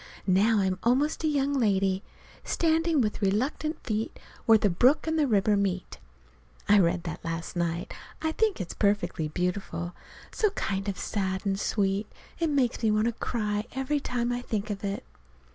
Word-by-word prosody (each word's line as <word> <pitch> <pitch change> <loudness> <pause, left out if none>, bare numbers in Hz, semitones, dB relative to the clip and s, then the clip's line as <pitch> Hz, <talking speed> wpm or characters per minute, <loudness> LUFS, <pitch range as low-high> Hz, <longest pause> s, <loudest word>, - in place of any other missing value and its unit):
Now 205 +3 +4
I'm 190 -1 0
almost 275 +7 +1
a - - +2
young 285 -2 +1
lady, 195 -6 +2 0.4
"standing 325 -2 +2
with 215 -2 -1
reluctant 255 - 0
feet 220 -1 -2 0.3
where 225 -1 +8
the 210 - +2
brook 245 - +3
and 320 0 0
river 210 -1 +3
meet." 190 -2 -2 0.7
(I 205 0 +6
read 170 -1 +2
that 170 -3 -6
last 165 +1 -4
night. 170 0 -2 0.3
I 315 - 0
think 435 - +1
it's 180 -3 -4
perfectly 190 -6 +1
beautiful. 175 +1 -3 0.4
So 425 - +2
kind 195 +1 -1
of 195 - -3
sad 190 -1 -2
and 195 0 0
sweet. 200 0 0 0.3
It 330 -1 +1
makes 265 -6 +1
me 225 - +3
want 215 +1 +2
to 235 - +2
cry 210 -2 -2
every 265 +3 0
time 245 -3 -1
I 245 0 -2
think 215 -3 -3
of 200 0 -5
it.) 200 0 -3
210 Hz, 170 wpm, -28 LUFS, 190-255 Hz, 0.7 s, where